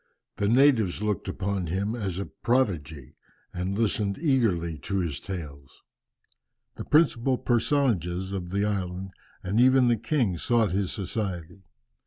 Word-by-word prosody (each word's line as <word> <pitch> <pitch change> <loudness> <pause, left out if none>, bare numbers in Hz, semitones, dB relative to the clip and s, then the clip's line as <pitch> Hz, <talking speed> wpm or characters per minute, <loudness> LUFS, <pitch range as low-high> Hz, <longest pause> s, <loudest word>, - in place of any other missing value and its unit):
The 100 - 0
natives 115 -6 +3
looked 105 -2 -1
upon 95 -2 -2
him 100 +6 -1
as 100 -7 -3
a 100 - -3
prodigy, 80 - -1 0.4
and 90 +2 -3
listened 105 -2 0
eagerly 105 - +1
to 100 +7 -3
his 85 -6 -2
tales. 75 -8 -8 0.9
The - - -7
principal 135 -5 +3
personages 110 - 0
of 90 -2 -4
the 100 +2 0
island, 95 -2 -3 0.3
and 100 +5 0
even 130 0 +5
the 120 - +3
king 110 - 0
sought 115 -3 +2
his 95 0 -1
society. 95 -3 -5
100 Hz, 135 wpm, -26 LUFS, 90-115 Hz, 0.9 s, even